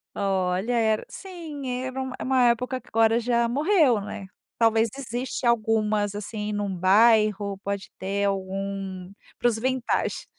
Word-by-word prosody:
Olha, 190 Hz, +3 st, 0 dB
era 220 Hz, -1 st, +2 dB
sim, 325 Hz, -8 st, -8 dB, 0.2 s
era 260 Hz, 0 st, -4 dB
um 260 Hz, -1 st, -3 dB
uma 260 Hz, -1 st, +2 dB
época 250 Hz, +2 st, -1 dB
que -, -, -25 dB
agora 225 Hz, +1 st, +3 dB
já 235 Hz, 0 st, +1 dB
morreu, 290 Hz, -, +3 dB
né. 200 Hz, -1 st, -7 dB, 0.3 s
Talvez 225 Hz, 0 st, +4 dB
existe 250 Hz, 0 st, -4 dB
algumas, 215 Hz, -3 st, +1 dB
assim, 210 Hz, 0 st, -4 dB
num 205 Hz, -2 st, -2 dB
bairro, 205 Hz, 0 st, +4 dB
pode 200 Hz, -1 st, -4 dB
ter 200 Hz, +1 st, -1 dB
algum 195 Hz, -1 st, -3 dB, 0.3 s
para 245 Hz, -, +2 dB
os 225 Hz, -, -2 dB
vintage. 255 Hz, +1 st, -1 dB
220 Hz, 140 wpm, -25 LUFS, 200-245 Hz, 0.3 s, Talvez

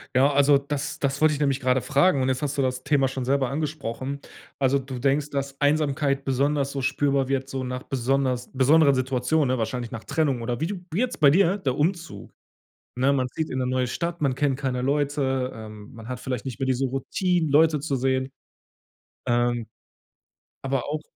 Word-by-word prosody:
Ja, 135 Hz, +3 st, +5 dB
also 140 Hz, 0 st, +5 dB
das 145 Hz, +2 st, -4 dB
das 140 Hz, 0 st, -1 dB
wollte 155 Hz, 0 st, +5 dB
ich 145 Hz, -, -4 dB
nämlich 140 Hz, -2 st, +1 dB
gerade 130 Hz, 0 st, +1 dB
fragen, 150 Hz, +1 st, +3 dB
und 130 Hz, -, +1 dB
jetzt 130 Hz, +2 st, -1 dB
hast 145 Hz, 0 st, -1 dB
du 140 Hz, -, +1 dB
das 130 Hz, -1 st, -1 dB
Thema 145 Hz, -2 st, +2 dB
schon 130 Hz, -1 st, -4 dB
selber 135 Hz, -1 st, +1 dB
angesprochen. 140 Hz, -2 st, -4 dB, 0.4 s
Also, 135 Hz, 0 st, +3 dB
du 130 Hz, -2 st, -6 dB
denkst, 140 Hz, +3 st, +1 dB
dass 140 Hz, -1 st, -4 dB
Einsamkeit 145 Hz, -1 st, +1 dB
besonders 140 Hz, +1 st, 0 dB
so 135 Hz, -1 st, -4 dB
spürbar 135 Hz, 0 st, +1 dB
wird 135 Hz, 0 st, -1 dB
so 135 Hz, -1 st, -3 dB
nach 125 Hz, 0 st, -4 dB
besonders 130 Hz, -1 st, -1 dB
besonderen 140 Hz, +3 st, +5 dB
Situationen, 130 Hz, +3 st, +1 dB
ne? -, -, -4 dB
Wahrscheinlich 115 Hz, +1 st, -3 dB
nach 115 Hz, -1 st, -7 dB
Trennung 140 Hz, -7 st, 0 dB
oder 120 Hz, 0 st, -2 dB
wie 160 Hz, -, 0 dB
du 200 Hz, -, -3 dB, 0.2 s
wie 170 Hz, -, -1 dB
jetzt 250 Hz, 0 st, -1 dB
bei 145 Hz, -2 st, +6 dB
dir, 190 Hz, +3 st, +3 dB
der 140 Hz, -10 st, -1 dB
Umzug, 170 Hz, +2 st, -2 dB, 0.6 s
ne? 130 Hz, +3 st, +2 dB
Man 130 Hz, -2 st, +1 dB
zieht 160 Hz, +4 st, -3 dB
in 130 Hz, -, -3 dB
'ne 130 Hz, -, 0 dB
neue 130 Hz, 0 st, 0 dB
Stadt, 170 Hz, +6 st, -3 dB
man 135 Hz, -4 st, +1 dB
kennt 140 Hz, -1 st, +1 dB
keine 130 Hz, -3 st, -2 dB
Leute, 135 Hz, -1 st, 0 dB
ähm, 110 Hz, -1 st, -10 dB
man 115 Hz, -1 st, -11 dB
hat 125 Hz, -1 st, -5 dB
vielleicht 125 Hz, -3 st, -4 dB
nicht 130 Hz, -1 st, -6 dB
mehr 135 Hz, -, 0 dB
diese 130 Hz, +1 st, +1 dB
Routinen, 160 Hz, +5 st, -1 dB
Leute 155 Hz, +1 st, +4 dB
zu 140 Hz, -1 st, -2 dB
sehen. 130 Hz, +1 st, 0 dB, 1.0 s
Ähm, 120 Hz, -1 st, +1 dB, 1.0 s
aber 135 Hz, -2 st, -1 dB
auch 150 Hz, +1 st, -2 dB
135 Hz, 200 wpm, -25 LUFS, 130-145 Hz, 1.0 s, bei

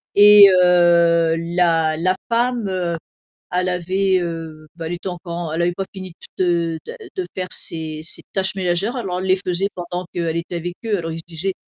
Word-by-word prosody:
et 205 Hz, 0 st, +9 dB
heu, 170 Hz, -2 st, +4 dB
la 165 Hz, -2 st, +1 dB
la 185 Hz, +4 st, +1 dB
femme, 235 Hz, -1 st, +1 dB
heu, 180 Hz, -3 st, -2 dB, 0.5 s
elle 180 Hz, +1 st, 0 dB
avait, 185 Hz, +2 st, +1 dB
heu, 165 Hz, -2 st, -6 dB
bah, 165 Hz, -1 st, -6 dB
elle 165 Hz, -, -3 dB
était 175 Hz, +2 st, -5 dB
encore 175 Hz, -1 st, -7 dB
en 170 Hz, -2 st, -4 dB
elle 165 Hz, +2 st, 0 dB
avait 175 Hz, +1 st, +1 dB
pas 195 Hz, +2 st, -4 dB
fini 185 Hz, -2 st, -8 dB, 0.2 s
de 170 Hz, -3 st, 0 dB
de -, -, -8 dB, 0.2 s
de 375 Hz, -2 st, -2 dB
faire 185 Hz, -1 st, -3 dB
ses 155 Hz, -1 st, -5 dB
ses 170 Hz, -, -4 dB
tâches 190 Hz, 0 st, -1 dB
ménagères, 190 Hz, +4 st, -1 dB
alors 195 Hz, -8 st, -3 dB
on -, -, -2 dB
les 185 Hz, 0 st, +2 dB
faisait 180 Hz, +2 st, 0 dB
pendant 175 Hz, 0 st, -5 dB
qu'elle 165 Hz, -2 st, -2 dB
était 170 Hz, +1 st, -4 dB
avec 175 Hz, +1 st, -4 dB
eux, 220 Hz, -2 st, +1 dB
alors 165 Hz, -1 st, -4 dB
ils 160 Hz, -, -5 dB
se -, -, -8 dB
disaient 175 Hz, +3 st, -3 dB
175 Hz, 200 wpm, -20 LUFS, 170-190 Hz, 0.5 s, et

